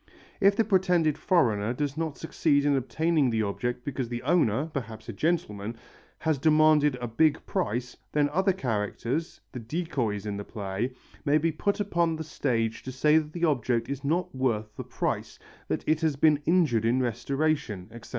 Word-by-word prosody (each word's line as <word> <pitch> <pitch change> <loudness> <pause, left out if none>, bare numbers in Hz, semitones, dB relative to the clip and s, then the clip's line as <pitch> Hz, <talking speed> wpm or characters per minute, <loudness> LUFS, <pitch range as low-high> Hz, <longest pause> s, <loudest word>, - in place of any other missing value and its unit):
If 200 0 +5
the 225 - +3
pretended 180 -7 +2
foreigner 115 - +2
does 145 0 -2
not 160 -2 -3
succeed 145 -3 +1
in 145 -1 +3
obtaining 150 +2 +1
the 110 -2 +1
object 120 +4 -3
because 130 -4 -3
the 120 0 -4
owner, 145 -4 +2
perhaps 115 -8 -6
a - - -5
gentleman, 115 -10 -1 0.4
has 160 -3 0
demanded 155 -1 +4
a 125 -1 -5
big 150 +6 +2
price, 125 - -2 0.2
then 150 -1 +2
other 190 +6 +2
characters, 125 - -2
the 125 - -6
decoys 120 - -2
in 105 -1 -3
the 100 - -5
play, 105 +4 -4 0.3
may 145 0 +3
be 165 +2 +1
put 200 +7 -1
upon 170 -5 +1
the 160 - -5
stage 115 -7 -1
to 130 - -6
say 150 +4 +4
that 155 -1 -7
the 175 -1 0
object 120 -5 0
is 140 0 -4
not 175 +5 0
worth 110 -5 -1
the - - -5
price, - - -3 0.3
that - - -2
it 155 +1 +1
has 160 -3 +1
been 150 +1 +3
injured 160 -11 +3
in 120 +3 +2
restoration, 125 -4 -1
etc. 120 0 -11
140 Hz, 180 wpm, -27 LUFS, 115-160 Hz, 0.4 s, If